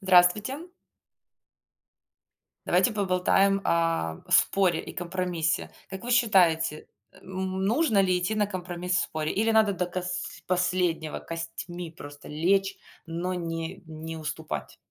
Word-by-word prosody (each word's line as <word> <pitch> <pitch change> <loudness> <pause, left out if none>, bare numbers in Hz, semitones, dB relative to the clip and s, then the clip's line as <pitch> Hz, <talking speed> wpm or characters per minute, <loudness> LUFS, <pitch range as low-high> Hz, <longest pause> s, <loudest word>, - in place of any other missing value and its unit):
Здравствуйте. 205 - +3 2.0
Давайте 245 - +4
поболтаем 195 0 +2
о 165 - +1
споре 190 -3 +4
и - - -9
компромиссе. 175 -2 -1 0.2
Как 190 +2 -7
вы 245 - -3
считаете, 175 -10 +3 0.2
э, - - -20
м, 190 0 -3
нужно 225 -2 +3
ли 185 -1 +2
идти 215 +5 -1
на 210 - +2
компромисс 180 -2 -3
в - - +3
споре 155 -1 -2
или 225 +2 +2
надо 220 -2 +4
до 180 -1 -1
кос 180 0 -4
последнего 180 -3 0
костьми 165 +1 -6
просто 145 -3 -11
лечь, 195 +6 +1 0.3
но 170 +2 -3
не 165 0 -4
не 160 +1 -7
уступать? 160 0 -5
180 Hz, 125 wpm, -27 LUFS, 165-195 Hz, 2.0 s, Давайте